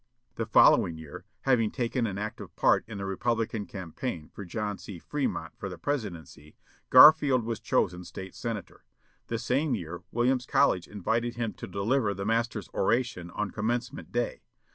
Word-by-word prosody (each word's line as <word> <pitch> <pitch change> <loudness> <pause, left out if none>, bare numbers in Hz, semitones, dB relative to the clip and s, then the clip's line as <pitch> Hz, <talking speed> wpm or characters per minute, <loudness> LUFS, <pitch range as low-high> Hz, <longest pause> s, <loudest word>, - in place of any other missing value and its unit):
The - - -3
following 80 -2 +5
year, 80 -2 -10 0.2
having 120 -5 +3
taken 120 0 -1
an 100 -2 -4
active 105 +1 -6
part - - +3
in 110 -2 -7
the 100 - -4
Republican 110 +2 -1
campaign 90 -2 -6
for 100 - -7
John 105 +2 -4
C. 100 - -8
Fremont 145 - -3
for - - -4
the - - -8
presidency, 85 - -5 0.3
Garfield 140 -2 +8
was 115 -1 -3
chosen 90 0 0
State 95 +1 -8
senator. 115 -5 -6 0.4
The 115 - -2
same 130 +4 0
year 85 -3 -6
Williams 125 +1 +1
College 90 -2 +3
invited 115 +4 -1
him 115 -2 -2
to - - -8
deliver 100 +3 0
the 100 - -4
master's 115 -2 0
oration 105 -4 0
on 105 +2 -3
Commencement 120 +3 -3
day. 120 0 -2
110 Hz, 160 wpm, -28 LUFS, 95-120 Hz, 0.4 s, Garfield